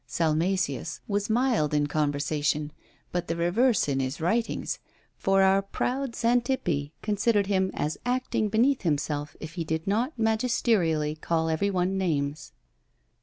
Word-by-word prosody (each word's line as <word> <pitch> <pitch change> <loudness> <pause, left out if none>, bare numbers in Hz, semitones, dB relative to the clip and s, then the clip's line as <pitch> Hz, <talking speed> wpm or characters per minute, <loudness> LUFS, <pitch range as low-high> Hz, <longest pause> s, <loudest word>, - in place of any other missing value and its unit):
Salmasius 165 -1 0
was 205 0 -1
mild 225 - +2
in 145 0 +2
conversation, 150 0 0 0.4
but 175 -1 -2
the 165 - -1
reverse 190 - +2
in 135 -2 0
his 130 +1 -2
writings, 220 +8 -1 0.4
for 195 0 +3
our 190 +1 +4
proud 250 +5 -2
Xantippe 235 - 0
considered 210 0 +2
him 190 -1 +1
as 150 +1 -2
acting 245 -3 0
beneath 245 +6 +3
himself 150 -3 -1
if 155 +1 -8
he 170 -1 -3
did 160 0 -2
not 235 +8 0
magisterially 220 -9 +1
call 160 +1 -1
every 160 +6 +1
one 190 0 0
names! 150 -4 -1
180 Hz, 135 wpm, -27 LUFS, 155-220 Hz, 0.4 s, our